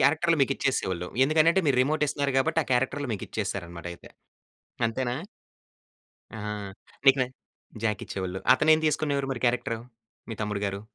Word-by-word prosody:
క్యారెక్టర్లు 160 +4 +3
మీకిచ్చేసేవోళ్ళు. 125 -10 0 0.2
ఎందుకనంటే 160 +5 +4
మీరు 135 -3 +3
రిమోట్ 150 +3 +1
ఇస్తున్నారు 140 -1 -1
గాబట్టి 160 +4 +2
ఆ - - -21
క్యారెక్టర్లు 135 +3 0
మీకు 100 - -4
ఇచ్చేసారనమాట 90 -5 -4
అయితే - - -16 0.8
అంతేనా? 120 +2 -2 1.2
ఆ! - - -7 0.7
నీకు 135 0 +7
న - - +3 0.6
జాక్ 105 -2 0
ఇచ్చేవాళ్ళు. 95 -1 -4
అతనేం 155 +4 +4
తీసుకునేవారు 145 -2 0
మరి 130 - -6
క్యారెక్టర్ 120 -1 0 0.5
మీ 115 - -3
తమ్ముడు 105 -1 -2
గారు? 100 0 -3
130 Hz, 135 wpm, -27 LUFS, 105-145 Hz, 1.2 s, నీకు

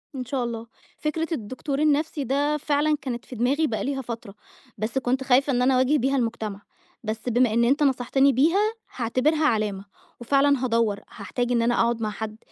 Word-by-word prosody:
إن 255 -1 -4
شاء 255 0 -2
الله، 230 -1 -5 0.3
فكرة 320 +2 -2
الدكتور 275 +1 -3
النفْسي 300 0 +1
ده 285 +4 +1
فعلًا 300 +1 +1
كانت 245 -3 -5
في 255 - -9
دماغي 270 +7 +1
بقى 220 -5 -2
ليها 270 0 -2
فترة، 230 -5 -7 0.4
بس 215 +4 -3
كنت 260 +1 0
خايفة 270 +2 +3
إن 245 - +1
أنا 260 +1 +4
أواجه 260 +4 +3
بيها 275 +1 +1
المجتمع، 225 -5 -2 0.4
بس 220 +2 -3
بما 245 -1 +3
إن 235 +1 +3
أنت 275 +5 +3
نصحتني 270 +1 +3
بيها، 360 - +3 0.2
هاعتبرها 265 +6 +1
علامة، 210 -6 0 0.3
وفعلًا 275 +2 +2
هادوّر، 230 -4 +1
هاحتاج 245 +5 -3
إن 240 -1 +2
أنا 240 +1 +2
أقعد 235 -1 +1
مع 215 - 0
حد 215 0 -6
255 Hz, 180 wpm, -25 LUFS, 230-285 Hz, 0.4 s, أنا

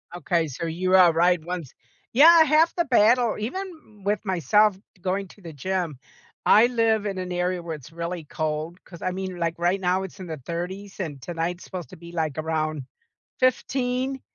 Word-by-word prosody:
Okay, 170 -1 0
so 140 +4 -5
you 185 +3 +1
are 180 -2 +7
right 175 0 +2
once 170 -5 -5 0.4
yeah 325 +6 +8
half 315 +2 +4
the 345 -2 +1
battle 235 -1 +4
even 295 - -7
with 205 +1 +1
myself 190 +3 +3 0.2
going 190 +2 -1
to 205 - -17
the 165 -3 -9
gym, 170 0 -2 0.5
I 220 +3 +7
live 225 -3 +1
in 195 -2 -3
an 185 -1 -4
area 180 0 -1
where 165 -1 -5
it's 150 +1 -13
really 170 0 -5
cold 155 +3 -4
'cause, 170 - -13
I 185 - -1
mean, 185 0 -4
like, 170 -1 -1
right 175 +3 +1
now, 185 +1 +1
it's 190 +1 -9
in 185 - -7
the 160 -2 -5
30s, 190 +4 -5
and 145 -7 -5
tonight's 175 +4 -3
supposed 175 -8 -7
to - - -12
be, 170 +1 -11
like, 155 -4 -2
around 155 -2 -2 0.6
15, 255 +1 0
180 Hz, 185 wpm, -25 LUFS, 165-210 Hz, 0.6 s, yeah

